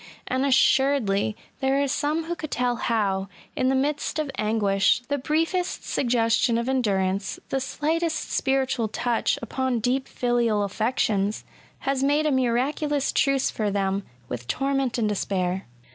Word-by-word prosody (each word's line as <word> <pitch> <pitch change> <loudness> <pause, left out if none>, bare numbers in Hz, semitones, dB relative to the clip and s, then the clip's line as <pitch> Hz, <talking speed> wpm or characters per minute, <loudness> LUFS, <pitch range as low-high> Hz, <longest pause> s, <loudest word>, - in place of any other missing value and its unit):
And 260 +2 0
assuredly 260 -6 +3 0.2
there 270 0 +2
are - - 0
some 300 +4 0
who 335 +2 -3
could 310 -3 -6
tell 245 -2 0
how, 195 -5 0 0.3
in 255 - +1
the 265 - +2
midst 290 +4 -1
of 305 -3 -1
anguish, 215 0 +2
the 285 0 0
briefest 330 +6 -1
suggestion 230 -1 +2
of 235 +1 -2
endurance, 195 -7 0
the 270 - 0
slightest 320 +5 -1
spiritual 265 -3 +1
touch 235 +2 0
upon 255 +1 -1
deep 255 +4 0
filial 235 -4 +1
affections, 210 -1 0 0.4
has 270 -1 0
made 290 +2 +2
a 305 - +2
miraculous 270 +3 +1
truce 275 -1 +2
for 215 -2 -1
them 195 0 0 0.3
with 120 -1 -6
torment 270 - 0
and 225 -3 +1
despair. 190 -2 -1
250 Hz, 145 wpm, -25 LUFS, 215-275 Hz, 0.4 s, assuredly